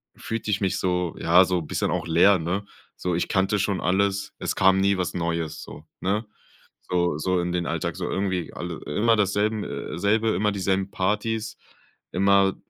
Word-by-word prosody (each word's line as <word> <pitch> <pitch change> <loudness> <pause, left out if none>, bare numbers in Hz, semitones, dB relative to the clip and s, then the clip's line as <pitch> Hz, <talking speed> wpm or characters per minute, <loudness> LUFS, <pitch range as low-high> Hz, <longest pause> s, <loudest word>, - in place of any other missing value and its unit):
fühlte 115 -1 -4
ich 100 - +1
mich 95 -1 0
so 90 -2 -1
ja, 90 +3 +5
so 90 -1 0
bisschen 75 - -2
auch - - -1
leer, 90 +4 +5
ne? 90 +5 -2 0.3
So, 90 -1 -1
ich 85 - -1
kannte 95 +2 +2
schon 95 -1 0
alles. 100 +2 0
Es - - -2
kam 95 0 +4
nie 100 0 +3
was 90 -1 -2
Neues, 85 -2 -2
so, 75 - -11 0.2
ne? 105 +4 0 0.6
So 85 -4 0
so 90 +3 0
in 90 - -2
den 90 -1 -1
Alltag, - - -2
so - - -3
irgendwie 95 -4 -2
alle 85 -2 -5
immer 115 +10 +2
dasselben, 105 +1 +1
äh 75 - -5
selbe, 110 +2 +2
immer 105 +1 +1
dieselben 95 0 -1
Partys, 105 +3 -1 0.5
immer 100 +1 +3
95 Hz, 180 wpm, -25 LUFS, 90-100 Hz, 0.6 s, ja